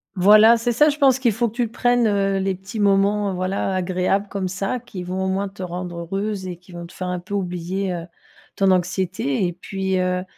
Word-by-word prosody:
Voilà, 215 +5 +7
c'est 240 +1 0
ça, 295 +6 +4
je 295 - -2
pense 265 -2 +4
qu'il 240 -4 +2
faut 235 +3 0
que - - -17
tu 240 -2 0
prennes, 245 0 +2
heu, 195 -1 +1
les 190 0 -1
petits 190 +4 -8
moments, 200 0 +2
heu, - - -3
voilà 190 +1 -1
agréables 185 +2 0
comme 195 -2 -3
ça 195 +6 -2
qui 205 -7 -8
vont 185 +1 -3
au - - 0
moins 195 +1 -1
te 195 0 -11
rendre 175 -1 -5
heureuse 195 +2 -3
et 175 -2 -6
qui 180 +1 -19
vont 175 0 -7
te - - -16
faire 185 - -5
un 180 -1 -2
peu 200 +4 -10
oublier, 180 0 -2
heu, 170 -1 -5 0.5
ton 195 -1 +3
anxiété. 180 -4 0
Et 175 - -2
puis, 190 +1 -3
heu, 180 0 0
190 Hz, 230 wpm, -22 LUFS, 180-205 Hz, 0.5 s, Voilà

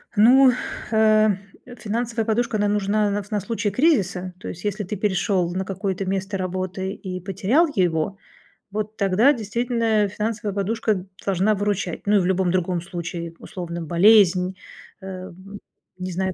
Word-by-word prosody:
Ну, 255 +5 +7 0.4
э, 215 -1 +5 0.5
финансовая 230 +1 -2
подушка, 230 0 0
она 205 0 +1
нужна 205 +1 +1
на 205 +1 -1
вс 205 - -16
на 210 - +1
случай 215 +1 -2
кризиса. 195 - +1
То - - -8
есть 175 - -7
если 210 0 -2
ты 205 +2 -4
перешел 190 -2 0
на 190 +1 -2
какое-то 195 0 -3
место 195 +1 -2
работы 185 +1 -3
и 185 -3 -6
потерял 195 - +2
его, 175 0 0 0.5
вот 215 +1 -4
тогда 205 +8 +4
действительно 230 -2 0
финансовая 210 +1 -3
подушка 205 -1 -1 0.2
должна 195 +2 +2
выручать. 200 -4 -2
Ну, 205 0 +4
и - - +5
в 180 - 0
любом 190 -1 +1
другом 180 -1 0
случае, 170 -1 -6
условно, 170 -3 -6
болезнь, 185 +1 +4 0.5
э, 185 -1 -7 0.7
не 185 0 -5
знаю, 190 +1 -1
195 Hz, 150 wpm, -23 LUFS, 185-215 Hz, 0.7 s, Ну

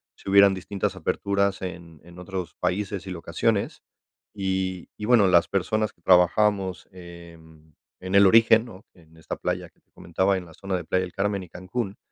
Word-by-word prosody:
se - - -9
hubieran 100 0 +7
distintas 95 +1 -3
aperturas 100 +2 -1
en 85 -4 -8
en 85 +1 -14
otros 90 -1 -6
países 95 +1 -2
y - - -5
locaciones. 85 -2 -2 0.5
Y 95 -2 -3
y 105 - -5
bueno, 115 -3 +5
las 85 -2 +4
personas 105 +2 -1
que - - -36
trabajamos 95 +2 +2
en 85 -4 -14 0.2
en 95 +1 -4
el 100 0 +7
origen, 115 +2 +5
¿no?, 105 -3 -13
en 80 -2 -21
esta 80 - -6
playa - - -3
que - - -38
te - - -48
comentaba, 95 +3 -1
en 90 - -7
la 80 - -15
zona 95 -1 -4
de 90 -3 -4
Playa 95 +3 0
del 90 - -8
Carmen 100 -1 -1
y 90 - -14
Cancún, 100 +2 -5
95 Hz, 185 wpm, -25 LUFS, 85-100 Hz, 0.5 s, hubieran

